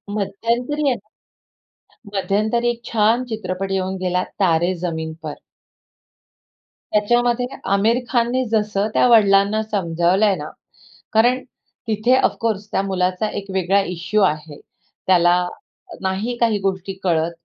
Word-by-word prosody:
मध्यंतरी 235 +8 -1
आहे 255 - +1 0.9
ना 205 -4 -10
मध्यंतरी 215 +5 +1
एक 240 0 -4
छान 225 +2 +3
चित्रपट 195 -3 -3
येऊन 190 0 -1
गेला, 180 0 0 0.2
"तारे 175 -1 +2
जमीन 160 -2 -3
पर." 155 -2 -4 1.6
त्याच्यामध्ये 240 +3 +2 0.3
आमिर 215 +4 +3
खानने 245 +1 +1
जसं 210 -2 +1
त्या - - +4
वडिलांना 205 -2 +4
समजावलंय 190 0 +1
ना, 150 -2 -6 0.6
कारण 245 +4 +3 0.4
तिथे 220 +3 +2
ऑफकोर्स 220 -5 0
त्या - - +1
मुलाचा 185 +1 -1
एक 200 - -10
वेगळा 190 +1 +2
इश्यू 180 +5 -1
आहे. 155 -5 -1 0.5
त्याला 175 -2 +5 0.7
नाही 195 +6 -2
काही 230 -3 +2
गोष्टी 195 0 -2
कळत 165 -2 +1
200 Hz, 115 wpm, -20 LUFS, 185-230 Hz, 1.6 s, त्याला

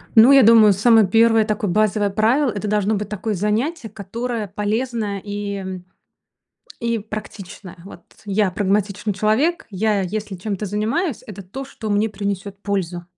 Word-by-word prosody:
Ну 225 +4 +8
я 275 - +7
думаю, 220 -2 +7
самое 220 +1 +5
1 225 +2 +4
такое 210 -3 -2
базовое 210 0 +1
правило- 235 +7 +2
это 210 0 -4
должно 210 +1 +1
быть 205 0 -3
такое 210 +1 -3
занятие, 225 - -1
которое 220 +3 -5
полезное 210 +1 -2
и, 205 0 -4
м, 185 -2 -6 0.9
и 235 -1 -1
практичное, 205 -3 -9
вот. 195 - -12 0.2
Я 205 -1 +1
прагматичный 205 +2 -1
человек. 215 - 0
Я 210 +1 0
если 205 +1 -4
чем-то 200 +2 -4
занимаюсь, 230 - -2
это 200 -2 -9
то, 265 +10 -8
что 225 -5 -7
мне 210 +2 +1
принесет 200 0 -5
пользу. 180 -4 -3
210 Hz, 150 wpm, -20 LUFS, 200-225 Hz, 0.9 s, Ну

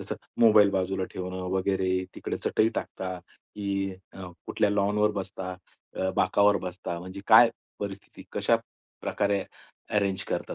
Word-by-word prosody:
जसं - - -5 0.2
मोबाईल 105 -3 +7
बाजूला 95 0 0
ठेवणं 90 0 -5
वगैरे, 95 -1 +1
तिकडे - - -4
चटई 110 - +3
टाकता 95 -3 -4
की 100 -1 -4 0.2
अ, 95 -2 -8 0.2
कुठल्या 105 - +1
लॉनवर 105 +1 +2
बसता, 95 -1 -6 0.4
अ, 95 - 0
बाकावर 100 +2 +4
बसता 90 -1 -5
म्हणजे 95 +2 -8
काय 115 +1 +8 0.3
परिस्थिती? 100 -1 -7
कशा - - +3 0.4
प्रकारे 100 -2 0 0.5
अरेंज 100 -2 +1
करता - - -2
95 Hz, 130 wpm, -27 LUFS, 95-100 Hz, 0.5 s, काय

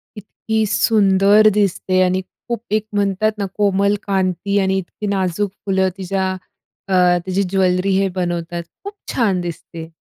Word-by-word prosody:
इतकी 220 +1 -3
सुंदर 205 0 +4
दिसते 190 -2 +1
आणि 185 +1 +1 0.3
खूप 235 -2 -2
एक 215 0 +1
म्हणतात 205 +1 +1
ना, 200 - -2
कोमल 200 0 +2
कांती 195 +1 0
आणि 190 0 +1
इतकी 190 +3 -5
नाजूक 195 0 -1
फुलं 190 -1 +1
तिच्या 190 0 -2 0.5
अ, 195 - -2 0.3
तिची 190 +1 0
ज्वेलरी 185 0 +1
हे 195 - +2
बनवतात, 175 -1 -3 0.2
खूप 405 - -6 0.2
छान 200 -7 +1
दिसते. 165 -1 -7
195 Hz, 140 wpm, -19 LUFS, 185-205 Hz, 0.5 s, सुंदर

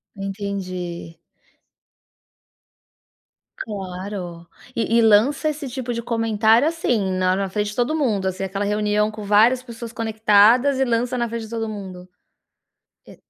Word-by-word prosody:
Entendi. 190 -4 -5 2.4
Claro. 185 -4 -6 0.3
E 230 0 +1
e - - +5
lança 230 +8 +4
esse 295 -2 -5
tipo 245 -1 -4
de 235 - -3
comentário, 225 +2 +2
assim, 240 - 0
na 185 0 +1
na 195 -1 -2
frente 210 +1 -1
de - - -10
todo 250 +6 0
mundo, 215 -10 0
assim, 190 +1 -3
aquela 195 +1 -3
reunião 210 +1 +1
com 215 -1 -8
várias 220 +5 +4
pessoas 235 -2 -9
conectadas 225 +4 +3
e 265 - +3
lança 240 +1 0
na 235 -1 0
frente 230 0 -5
de - - -12
todo 225 -1 -3
mundo? 190 -4 -8 1.0
E - - -14
215 Hz, 140 wpm, -22 LUFS, 195-235 Hz, 2.4 s, e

